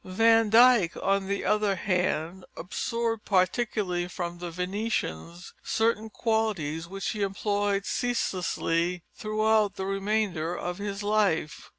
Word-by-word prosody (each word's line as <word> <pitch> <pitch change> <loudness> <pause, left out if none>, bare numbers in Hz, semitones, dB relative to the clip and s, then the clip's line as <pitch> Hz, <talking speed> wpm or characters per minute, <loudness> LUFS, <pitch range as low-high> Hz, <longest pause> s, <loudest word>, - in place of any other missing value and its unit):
Van 225 +3 +3
Dyck, 230 -5 +5
on 195 0 0
the 200 0 -2
other 210 -2 +2
hand, 180 -1 -1
absorbed, 225 +6 -2
particularly 185 -2 0
from 175 -1 -5
the 175 0 -5
Venetians, 180 - -3
certain 220 -1 0
qualities 205 -9 -1
which 195 +2 -4
he 210 - -4
employed 200 0 0
ceaselessly 180 -7 -1
throughout 215 -1 +1
the 190 - -4
remainder 195 -4 -1
of 175 +2 -4
his 200 0 -4
life. 205 -7 0
195 Hz, 115 wpm, -27 LUFS, 180-215 Hz, -, Dyck